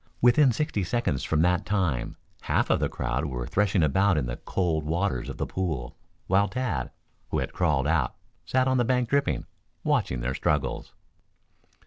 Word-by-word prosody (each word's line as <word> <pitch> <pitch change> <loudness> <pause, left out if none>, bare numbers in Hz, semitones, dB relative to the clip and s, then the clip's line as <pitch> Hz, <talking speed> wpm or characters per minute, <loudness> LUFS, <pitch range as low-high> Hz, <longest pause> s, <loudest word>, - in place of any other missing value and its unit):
Within 125 +3 +5
sixty 120 -4 -1
seconds 90 - -1
from 80 0 +1
that 90 0 +2
time 90 -12 -1 0.3
half - - +1
of - - +3
the - - 0
crowd 65 +4 -2
were 60 -4 -3
threshing 100 +2 +2
about 95 +4 +3
in 70 - 0
the - - -4
cold 85 -5 -1
waters 80 -4 -1
of - - -6
the - - -1
pool, 80 -10 -3 0.3
while 100 +2 +3
Tad, 100 - -2 0.4
who - - -1
had - - -2
crawled 75 -6 +1
out, 75 -5 +1 0.3
sat 130 0 +1
on 130 0 +2
the 120 - +3
bank 125 -1 +1
dripping, 140 0 +1 0.4
watching 65 -2 0
their 65 +2 -1
struggles. 65 -1 -1
90 Hz, 170 wpm, -27 LUFS, 70-110 Hz, 0.4 s, Within